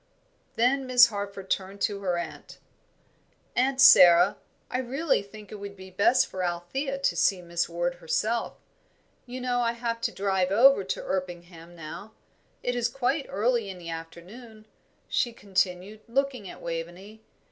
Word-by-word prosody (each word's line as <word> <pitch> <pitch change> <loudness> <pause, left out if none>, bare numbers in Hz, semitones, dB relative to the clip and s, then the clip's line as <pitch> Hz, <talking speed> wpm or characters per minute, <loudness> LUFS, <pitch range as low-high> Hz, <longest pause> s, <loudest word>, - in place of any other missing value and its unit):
Then 260 +3 +1
Miss 250 -1 +7
Harford 200 -2 -6
turned 195 +1 -2
to 200 0 0
her 180 -3 -1
aunt. 170 -1 -7 1.0
"Aunt 260 +2 +1
Sara, 180 -6 +8 0.3
I 250 - -2
really 270 +5 0
think 205 +1 -13
it 210 - -8
would 200 0 -8
be 190 0 -12
best 235 +8 +3
for 185 -1 -5
Althea 180 +12 -3
to 275 - 0
see 195 -3 +2
Miss 170 -1 -2
Ward 175 +1 -2
herself. 220 +8 -1 0.7
You 250 +1 -6
know 245 -1 0
I 235 -1 +1
have 230 -1 -4
to - - -1
drive 190 -2 0
over 235 +2 +5
to 190 - -4
Erpingham 175 -2 -6
now. 170 +7 -9 0.5
It 245 - -1
is 240 -1 0
quite 270 +3 -1
early 230 0 0
in 190 - -7
the 170 -1 -8
afternoon," 195 +8 -10 0.4
she 240 -2 0
continued, 195 0 -2
looking 255 -4 -1
at - - -12
Waveney. 175 +6 -7
200 Hz, 155 wpm, -27 LUFS, 180-245 Hz, 1.0 s, Sara